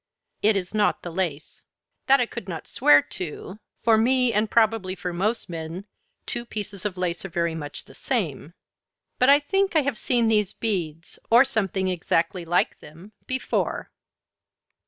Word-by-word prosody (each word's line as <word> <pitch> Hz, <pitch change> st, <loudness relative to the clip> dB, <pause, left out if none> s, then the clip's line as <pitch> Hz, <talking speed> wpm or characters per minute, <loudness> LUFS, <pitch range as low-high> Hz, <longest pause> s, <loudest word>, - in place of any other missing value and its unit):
It 215 Hz, +1 st, +4 dB
is 185 Hz, 0 st, -4 dB
not 210 Hz, -1 st, +1 dB
the 175 Hz, -, -5 dB
lace. 165 Hz, -4 st, -4 dB, 0.5 s
That 275 Hz, +1 st, +6 dB
I 245 Hz, -, +3 dB
could 195 Hz, -4 st, -8 dB
not 165 Hz, -, -5 dB
swear 145 Hz, 0 st, +5 dB
to; 180 Hz, +6 st, -7 dB, 0.2 s
for 225 Hz, -1 st, +5 dB
me 250 Hz, +1 st, +3 dB
and 210 Hz, +1 st, +1 dB
probably 220 Hz, -5 st, +2 dB
for 180 Hz, -2 st, -5 dB
most 210 Hz, +7 st, -1 dB
men 165 Hz, +3 st, -6 dB, 0.4 s
two 240 Hz, -, -4 dB
pieces 205 Hz, -4 st, -6 dB
of 195 Hz, -3 st, -2 dB
lace 175 Hz, -1 st, -2 dB
are 195 Hz, -, -6 dB
very 170 Hz, -1 st, -1 dB
much 145 Hz, -3 st, -7 dB
the -, -, -16 dB
same. 170 Hz, -, -3 dB, 0.6 s
But 255 Hz, -, +5 dB
I 285 Hz, +1 st, +8 dB
think 390 Hz, +5 st, 0 dB
I 310 Hz, -, +4 dB
have 265 Hz, -5 st, -2 dB
seen 240 Hz, -2 st, +1 dB
these 210 Hz, -2 st, +2 dB
beads, 170 Hz, -7 st, -3 dB
or 240 Hz, +4 st, +7 dB
something 195 Hz, -7 st, -1 dB
exactly 175 Hz, 0 st, 0 dB
like 175 Hz, +2 st, +1 dB
them, 170 Hz, +7 st, -14 dB, 0.2 s
before." 260 Hz, 0 st, -2 dB
195 Hz, 165 wpm, -24 LUFS, 170-230 Hz, 0.6 s, I